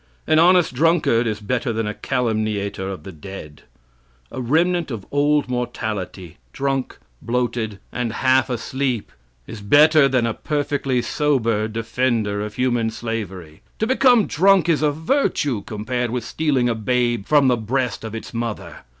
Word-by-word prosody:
An 155 - +3
honest 175 -2 +4
drunkard 150 -5 +2
is 105 -2 -2
better 120 +3 -1
than 115 0 -2
a 105 - -3
calumniator 110 -6 -2
of 95 - -7
the 95 - -8
dead. 80 -3 -10 0.7
"A 130 - -5
remnant 165 +6 +1
of 110 -6 -6
old 145 0 +2
mortality 110 -8 -4 0.2
drunk, 135 -1 -2 0.2
bloated, 120 -3 -2
and 120 -2 -2
half 130 +1 +2
asleep," 125 0 -2 0.3
is 110 - -9
better 150 +7 +5
than 130 -3 +1
a 115 - -1
perfectly 140 -4 -1
sober 115 -8 0
defender 115 -2 -1
of 105 0 -5
human 120 -3 +1
slavery. 105 -8 -6 0.2
To 220 - 0
become 250 -3 +4
drunk 190 0 +3
is 165 -3 +2
a 150 - +3
virtue 145 - 0
compared 120 +3 -2
with 120 0 -3
stealing 140 -6 0
a 120 - +1
babe 120 -1 0
from 145 -3 +4
the 125 - +4
breast 120 0 -2
of 110 0 -6
its 115 - -8
mother. 115 -2 -4
120 Hz, 150 wpm, -21 LUFS, 110-145 Hz, 0.7 s, better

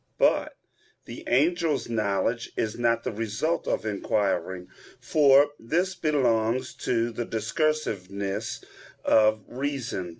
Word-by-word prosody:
But - - +2 0.5
the - - -9
angels' 150 0 +2
knowledge 110 +1 -1
is 110 -1 -1
not 115 -1 +1
the - - -2
result 115 +9 -2
of - - -1
inquiring, 100 -3 -1 0.3
for 140 +2 +5
this 175 +11 0
belongs 130 -8 +1
to 115 -1 +1
the 120 +1 -3
discursiveness 110 - -2 0.4
of 110 -1 +4
reason. 125 -8 -3
115 Hz, 105 wpm, -26 LUFS, 110-145 Hz, 0.5 s, for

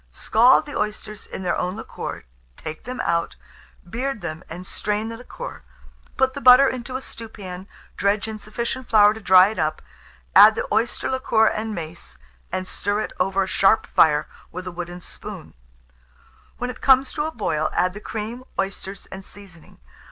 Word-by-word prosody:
Scald 235 - +4
the 290 - -8
oysters 210 0 -4
in 190 - -7
their 180 - 0
own 180 +2 -2
liquor, 225 - -6 0.3
take 155 0 -8
them 255 +1 -6
out, 170 0 0 0.5
beard 245 +4 -3
them, 165 0 -5
and 180 +3 -8
strain 210 +3 -2
the 230 - -6
liquor; 475 - -8 0.6
put 265 0 +2
the - - -6
butter 255 +3 +8
into 255 0 -4
a 260 - -3
stewpan, 195 -5 -9 0.3
dredge 200 +1 +1
in 220 -1 -6
sufficient 235 +4 -4
flour 210 -1 +6
to 220 - -9
dry 185 -1 +7
it 215 - -6
up, 155 -1 0 0.5
add - - +9
the - - -2
oyster 235 - 0
liquor 260 -4 +2
and 220 0 -1
mace, 160 - -8 0.3
and 185 0 -3
stir 205 +3 -1
it - - -5
over 195 +1 +2
a - - -4
sharp 195 +3 +3
fire 150 -2 +3 0.2
with 185 - -7
a 180 - -5
wooden 175 0 -7
spoon; - - -9 1.0
when 245 +1 -3
it 250 - -14
comes 265 0 +4
to 300 0 -1
a - - -4
boil, 155 - -1
add 180 +1 +1
the 210 - -9
cream, 225 +4 -5 0.2
oysters, 195 0 -4
and 190 0 -8
seasoning. 190 -5 -14
210 Hz, 175 wpm, -23 LUFS, 185-235 Hz, 1.0 s, add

